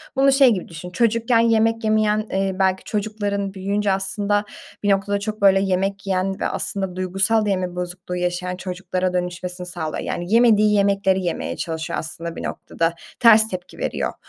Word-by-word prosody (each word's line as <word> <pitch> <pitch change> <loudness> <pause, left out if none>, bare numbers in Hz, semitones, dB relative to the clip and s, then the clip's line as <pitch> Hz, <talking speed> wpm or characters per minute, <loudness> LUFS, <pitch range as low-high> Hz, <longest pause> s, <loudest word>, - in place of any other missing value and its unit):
Bunu 275 +1 +4
şey 270 -1 +6
gibi 185 - -4
düşün, 165 +1 -8
çocukken 230 +4 +2
yemek 225 0 +2
yemeyen, 215 0 +2
eee, 195 0 0
belki 190 0 +1
çocukların 205 -2 -2
büyüyünce 200 +1 -1
aslında 200 +2 0 0.4
bir 205 - +1
noktada 200 +1 +1
çok, 215 +1 -5
böyle, 195 -1 +6
yemek 195 +1 -1
yiyen 190 0 -1
ve - - 0
aslında 190 -2 -3
duygusal 195 +4 +1
da 205 - 0
yeme 185 -2 -1
bozukluğu 180 0 -5
yaşayan 180 +1 -2
çocuklara 185 0 -3
dönüşmesini 180 0 -4
sağlıyor. 160 -3 -4
Yani, 175 +4 -3
yemediği 215 -3 +5
yemekleri 195 -2 +2
yemeye 175 - -3
çalışıyor 160 -2 -3
aslında 165 +1 -6
bir - - -6
noktada. 165 0 -2 0.3
Ters 220 -2 +7
tepki 185 -4 -7
veriyor. - - -2
195 Hz, 165 wpm, -22 LUFS, 180-210 Hz, 0.4 s, Ters